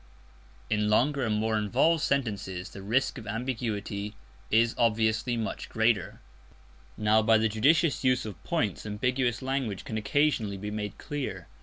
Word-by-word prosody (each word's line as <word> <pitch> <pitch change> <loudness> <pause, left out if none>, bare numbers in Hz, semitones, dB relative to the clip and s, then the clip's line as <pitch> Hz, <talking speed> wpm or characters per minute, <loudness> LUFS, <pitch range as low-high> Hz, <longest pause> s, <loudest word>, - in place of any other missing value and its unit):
In 105 -1 +1
longer 135 +6 +2
and 110 -3 +1
more 110 +1 0
involved 125 - +2
sentences 100 -10 -1
the 100 - -9
risk 120 +7 0
of 110 - -11
ambiguity 110 -3 -3 0.3
is 115 +1 +3
obviously 115 +1 +1
much 110 -2 -4
greater. 110 -4 +1 0.8
Now 105 +1 +4
by 110 +1 +5
the 110 0 +2
judicious 140 +10 +2
use 130 -2 +2
of 100 -7 -8
points - - -1
ambiguous 120 +3 -1
language 130 -7 -2
can 110 - -3
occasionally 110 -4 +1
be 105 +2 -5
made 105 -2 -4
clear. 145 -3 -5
110 Hz, 145 wpm, -28 LUFS, 105-125 Hz, 0.8 s, by